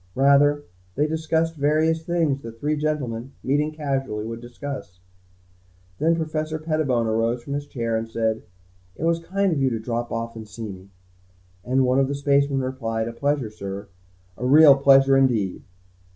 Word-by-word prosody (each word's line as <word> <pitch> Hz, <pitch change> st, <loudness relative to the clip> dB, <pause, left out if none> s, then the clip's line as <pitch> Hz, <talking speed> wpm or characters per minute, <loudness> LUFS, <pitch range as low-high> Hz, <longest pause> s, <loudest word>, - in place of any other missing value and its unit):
Rather, 140 Hz, +2 st, +4 dB, 0.3 s
they 145 Hz, -, +2 dB
discussed 160 Hz, +1 st, 0 dB
various 155 Hz, +3 st, +2 dB
things, 160 Hz, -5 st, 0 dB
that 115 Hz, -1 st, -10 dB
three 150 Hz, +3 st, 0 dB
gentlemen, 135 Hz, -5 st, -3 dB
meeting 145 Hz, +3 st, +1 dB
casually, 135 Hz, -8 st, -3 dB
would 115 Hz, +1 st, -6 dB
discuss. 120 Hz, -6 st, -8 dB, 1.0 s
Then 165 Hz, +2 st, +3 dB
Professor 155 Hz, -1 st, -2 dB
Pettibone 155 Hz, -7 st, 0 dB
arose 115 Hz, +2 st, 0 dB
from 140 Hz, -, -5 dB
his 145 Hz, 0 st, -4 dB
chair 115 Hz, -4 st, -2 dB
and 110 Hz, 0 st, -3 dB
said, 110 Hz, -1 st, -1 dB, 0.5 s
"It -, -, -7 dB
was 165 Hz, 0 st, +2 dB
kind 195 Hz, +3 st, 0 dB
of 150 Hz, -, -1 dB
you 135 Hz, -, +3 dB
to 115 Hz, -, -2 dB
drop 115 Hz, +1 st, -3 dB
off 115 Hz, 0 st, -4 dB
and 110 Hz, -1 st, -8 dB
see 110 Hz, +1 st, -7 dB
me." 95 Hz, +1 st, -12 dB, 0.7 s
And 130 Hz, +1 st, +2 dB
one 125 Hz, +1 st, +2 dB
of 135 Hz, -, +3 dB
the 140 Hz, -, -2 dB
spacemen 140 Hz, -1 st, +2 dB
replied, 115 Hz, -4 st, -3 dB
"A 115 Hz, -, -5 dB
pleasure, 140 Hz, -3 st, -1 dB
sir. 100 Hz, -1 st, -7 dB, 0.5 s
A 125 Hz, -, -3 dB
real 145 Hz, +1 st, +8 dB
pleasure 135 Hz, 0 st, +5 dB
indeed." 120 Hz, -8 st, +1 dB
135 Hz, 165 wpm, -23 LUFS, 115-150 Hz, 1.0 s, real